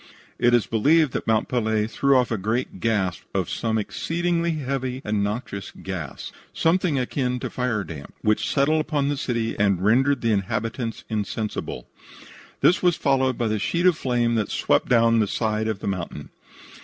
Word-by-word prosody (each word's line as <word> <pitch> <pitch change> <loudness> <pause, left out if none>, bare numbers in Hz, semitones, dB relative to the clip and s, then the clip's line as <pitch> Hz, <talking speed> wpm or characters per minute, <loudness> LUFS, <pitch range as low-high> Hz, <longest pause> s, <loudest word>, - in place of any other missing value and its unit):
It 120 0 +4
is 115 -5 +2
believed 145 +8 +3
that - - -3
Mont 110 -1 +2
Pelee 110 -3 0
threw 140 +4 +2
off 125 -2 +1
a 115 - 0
great 110 +1 -2
gasp 95 -6 0
of - - -1
some 110 -1 -1
exceedingly 170 - -1
heavy 130 -3 -3
and 105 -1 0
noxious 100 -2 -4
gas, 90 -7 -7 0.2
something 165 -2 +1
akin 125 0 -1
to - - -4
firedamp, 100 - -3
which 110 0 +1
settled 155 +3 +2
upon 145 -2 0
the 145 - 0
city 115 -4 -2
and 100 -2 +2
rendered 130 +5 +3
the 115 - +1
inhabitants 115 +4 -2
insensible. 105 - -3 0.8
This 180 - +4
was 180 -2 +3
followed 130 -2 +1
by 120 - 0
the 110 -1 0
sheet 170 - 0
of 180 -2 +5
flame 120 -4 0
that 110 -3 0
swept - - +1
down 115 -1 +4
the 105 - +2
side 110 +1 -1
of 110 -3 -3
the - - -4
mountain. 90 -6 -4
115 Hz, 170 wpm, -24 LUFS, 105-135 Hz, 0.8 s, of